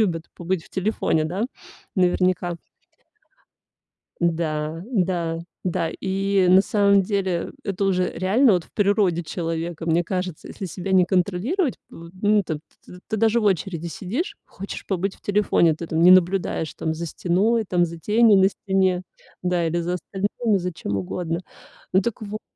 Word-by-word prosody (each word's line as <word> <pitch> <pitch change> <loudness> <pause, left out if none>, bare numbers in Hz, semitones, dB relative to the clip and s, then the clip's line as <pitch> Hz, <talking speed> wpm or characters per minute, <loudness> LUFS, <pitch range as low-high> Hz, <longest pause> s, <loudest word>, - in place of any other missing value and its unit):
любят 170 -6 +1
побыть 175 -1 -2
в - - -18
телефоне, 190 -5 0
да, 180 +6 -2 0.5
наверняка. 180 -1 +1 1.6
Да, 160 -1 -1
да, 180 -7 0 0.3
да. 175 -2 0
И, 195 0 +1
на 185 +1 +7
самом 200 -1 +3
деле, 190 -3 -1
это 200 0 -1
уже 185 -2 +1
реально 210 +8 +3
вот 175 -3 +1
в - - -26
природе 200 -4 +2
человека. 165 0 -4
Мне 170 +1 +3
кажется, 180 -2 -4
если 195 - -6
себя 185 +2 -5
не 185 -1 +6
контролировать, 200 - 0 0.2
ну, 190 +5 0
т 160 -4 -4 0.5
ты 220 - -1
даже 225 +2 +3
в - - -2
очереди 175 -3 0
сидишь, 205 - -4
хочешь 195 +2 -8
побыть 190 0 -1
в - - -28
телефоне. 200 -5 +3
Ты 165 +2 -7
там 160 0 0
не 180 - +8
наблюдаешь 185 -3 +3
там 160 - -2
за 170 +1 -4
стеной, 205 +8 +1
там 180 -3 +2
за 165 0 -8
тенью 215 +3 +4
на 190 0 +6
стене. 190 -3 0 0.4
Да 180 -2 +1
или 170 +1 0
за 175 +1 -2
остальными 205 +4 -1
за 180 0 -3
чем 100 -10 -4
угодно. 165 - -3 0.5
Ну, 190 +1 +4
так 235 +3 -3
вот 215 +1 -5
185 Hz, 155 wpm, -23 LUFS, 170-200 Hz, 1.6 s, не